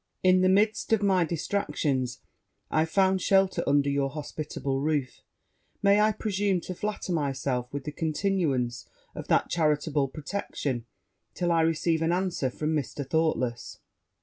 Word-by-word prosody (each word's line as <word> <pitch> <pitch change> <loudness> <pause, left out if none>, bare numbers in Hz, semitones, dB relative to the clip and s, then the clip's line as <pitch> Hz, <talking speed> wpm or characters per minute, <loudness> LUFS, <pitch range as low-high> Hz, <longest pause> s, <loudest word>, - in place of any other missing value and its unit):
In 185 0 +5
the 185 - +4
midst 210 +4 +2
of 215 -2 +2
my 190 -3 +3
distractions, 150 - -1 0.5
I 155 0 +3
found 190 +2 +2
shelter 195 -1 +3
under 140 0 +3
your 140 -1 +1
hospitable 145 -2 -4
roof; 145 -3 -1 0.6
may 200 +1 +5
I 215 +1 +4
presume 200 -3 0
to 185 - -6
flatter 205 -1 -3
myself 135 -4 -1
with 140 -1 -4
the 150 - -5
continuance 155 - -1 0.3
of - - -7
that - - +3
charitable 150 -3 +1
protection, 140 - -4 0.5
till 175 -1 0
I 165 -1 +3
receive 160 0 +1
an 165 +1 +1
answer 180 -7 0
from 155 +5 -2
Mr. 145 -1 -3
Thoughtless?' 130 -7 -1
160 Hz, 145 wpm, -27 LUFS, 140-190 Hz, 0.6 s, In